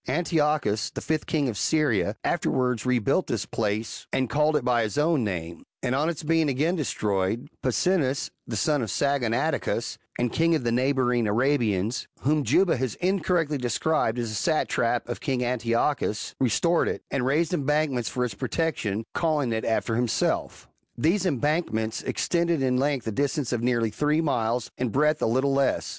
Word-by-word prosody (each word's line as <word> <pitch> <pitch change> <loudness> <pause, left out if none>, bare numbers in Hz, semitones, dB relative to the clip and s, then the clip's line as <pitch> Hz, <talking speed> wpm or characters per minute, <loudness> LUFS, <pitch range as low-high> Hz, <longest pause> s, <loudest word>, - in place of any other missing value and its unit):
Antiochus, 150 - +1
the - - -6
fifth 155 -1 -2
king 150 -4 +1
of 115 - -2
Syria, 120 -10 +1
afterwards 125 -8 0
rebuilt 125 - +1
this 110 -4 -2
place 110 0 -3
and 130 -3 0
called 150 +1 +2
it 140 -5 0
by 120 -1 +3
his 110 +5 -2
own 150 -3 +2
name; 85 -5 -4 0.2
and 125 -1 0
on 150 +5 +1
its 165 -2 -4
being 160 -1 +2
again 150 +7 +1
destroyed, 110 - -1
Pasines, 140 +1 +1 0.2
the 115 - -4
son 145 +7 +1
of 115 - -3
Saggonadacus, 125 +2 0 0.2
and 120 -1 -1
king 165 0 +3
of 155 - -2
the 120 - 0
neighbouring 125 -2 +1
Arabians, 115 -2 +1
whom 150 +2 +2
Juba 180 +1 +3
has 125 -3 -2
incorrectly 175 -5 0
described 125 0 0
as 120 -2 -2
a - - -5
satrap 120 -2 0
of 120 - -4
king 130 -4 -1
An 125 0 -1
tiochus, 115 0 0
restored 150 - +2
it, - - -3
and 135 -2 0
raised 155 +6 +1
embankments 150 -5 0
for 125 -1 -1
its 120 - -4
protection, 115 -4 -2
calling 150 -7 0
it 110 - -2
after 115 0 0
himself. 120 -1 -1 0.3
These 185 +5 +2
embankments 135 -7 -1
extended 170 -4 0
in 125 -1 +2
length 135 -3 0
a 110 - -2
distance 140 +2 -1
of 120 - -1
nearly 120 -2 +1
three 150 +7 +1
miles, 120 -6 0
in 125 -1 0
breadth 150 +5 +2
a - - +2
little 130 +4 +1
less. 135 -1 +1
130 Hz, 170 wpm, -26 LUFS, 115-150 Hz, 0.3 s, by